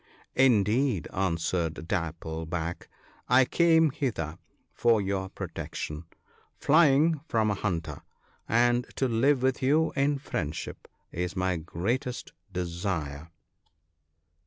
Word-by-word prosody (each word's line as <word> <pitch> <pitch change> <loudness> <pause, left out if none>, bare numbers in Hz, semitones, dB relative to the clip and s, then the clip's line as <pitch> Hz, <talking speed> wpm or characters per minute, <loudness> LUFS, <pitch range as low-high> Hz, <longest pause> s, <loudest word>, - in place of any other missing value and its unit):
" - - -48
Indeed," 110 - +2
answered 85 -3 -1
Dapple 80 -3 -3
back, 85 0 -4 0.2
" - - -31
I 130 - +6
came 160 0 +4
hither 110 - -3 0.3
for 115 -2 +3
your 95 -1 -2
protection, 75 -2 -6 0.5
flying 155 +1 +4
from 110 -2 +1
a - - +1
hunter; 85 -7 -3 0.5
and 120 +1 +3
to 135 - +1
live 130 +3 +2
with 130 0 +1
you 150 +5 +2
in 140 +1 +2
friendship 80 - -5 0.2
is 90 +2 -3
my 95 -1 0
greatest 115 - -3 0.2
desire." 85 -4 -3
100 Hz, 110 wpm, -28 LUFS, 85-130 Hz, 0.5 s, I